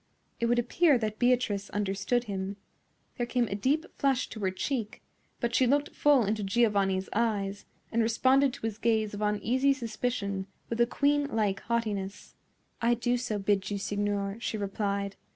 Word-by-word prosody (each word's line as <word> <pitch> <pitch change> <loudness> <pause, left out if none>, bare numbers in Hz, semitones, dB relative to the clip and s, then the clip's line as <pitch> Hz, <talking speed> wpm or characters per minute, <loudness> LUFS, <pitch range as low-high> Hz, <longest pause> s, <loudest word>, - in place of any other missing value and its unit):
It 235 - +1
would 240 +1 +2
appear 275 +5 +3
that 215 -2 -3
Beatrice 245 -5 +1
understood 205 +4 0
him. 195 -2 -4 0.6
There 240 - -1
came 245 -1 +1
a - - -2
deep 275 +11 +1
flush 270 -2 +2
to 220 - -8
her 195 -2 +1
cheek; 215 +3 -3 0.4
but 235 -1 -1
she 255 - +4
looked 285 +3 +1
full 285 -6 +4
into 210 +1 -1
Giovanni's 195 -3 +2
eyes, 205 -3 -1 0.2
and 230 - +2
responded 260 +4 +3
to - - -6
his 215 -1 -3
gaze 220 -2 +1
of 205 - -5
uneasy 230 +7 +2
suspicion 220 -6 -3 0.2
with 230 +1 0
a 235 - +5
queenlike 280 -8 +1
haughtiness. 210 -4 -3 0.5
"I 235 +1 +3
do 240 +1 0
so 240 -4 -2
bid 195 -1 0
you, 205 - -2
signor," 205 0 -2
she 230 - -3
replied. 200 -1 -2
220 Hz, 165 wpm, -29 LUFS, 200-245 Hz, 0.6 s, a